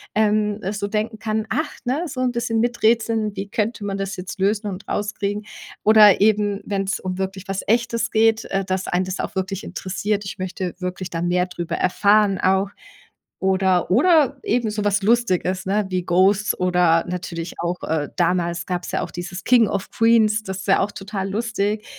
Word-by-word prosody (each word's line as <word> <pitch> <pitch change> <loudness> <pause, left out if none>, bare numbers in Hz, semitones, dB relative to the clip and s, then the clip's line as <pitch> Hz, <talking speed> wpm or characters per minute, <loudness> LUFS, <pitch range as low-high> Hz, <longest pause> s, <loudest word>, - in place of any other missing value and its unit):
ähm, 210 -1 +2
so 200 -1 -3
denken 220 +2 -2
kann, 215 0 -2
ach 300 +7 -1
ne? 265 +7 0
So 265 - -6
'n 255 -1 +1
bisschen 235 -1 -1
miträtseln, 225 -2 +1
wie 195 0 -4
könnte 215 +1 -2
man 195 -1 -2
das 195 0 -3
jetzt 180 +1 -7
lösen 210 +2 +1
und 195 0 -6
rauskriegen 205 0 -2 0.4
oder 210 -2 +7
eben, 205 -1 +2
wenn's 195 -1 -2
um 185 -1 -4
wirklich 190 +1 -4
was 195 0 -3
Echtes 230 +1 +1
geht, 225 0 +3
äh, 195 0 0
dass 185 0 -2
einen 180 +1 +1
das 185 0 -5
auch - - -5
wirklich 190 +1 -3
interessiert, 200 +3 -3
ich 195 - -6
möchte 185 -1 -4
wirklich 180 0 -4
dann 170 0 -2
mehr 180 0 +2
drüber 175 -2 -4
erfahren 200 +1 +3
auch 190 +1 +2 0.7
oder 190 -1 +2
oder 280 - +4
eben 235 -1 0
so 210 0 -3
was 205 0 +2
Lustiges, 190 -5 +1
ne? 205 +2 +1
Wie 185 -1 -1
„Ghosts“ 190 +4 +3
oder 180 -2 +3
natürlich 175 -1 -5
auch, 175 +1 -2
äh, 155 -2 -1
damals 175 -1 0
gab's 180 -1 -3
ja - - -1
auch - - -7
dieses 175 +1 -6
„King 235 -4 +5
of 200 -1 -3
Queens“, 220 -2 +3
das 190 -2 -5
ist 190 - -8
ja 195 - +4
auch 205 - -1
total 195 0 -5
lustig. 215 -1 -1
200 Hz, 185 wpm, -22 LUFS, 185-215 Hz, 0.7 s, oder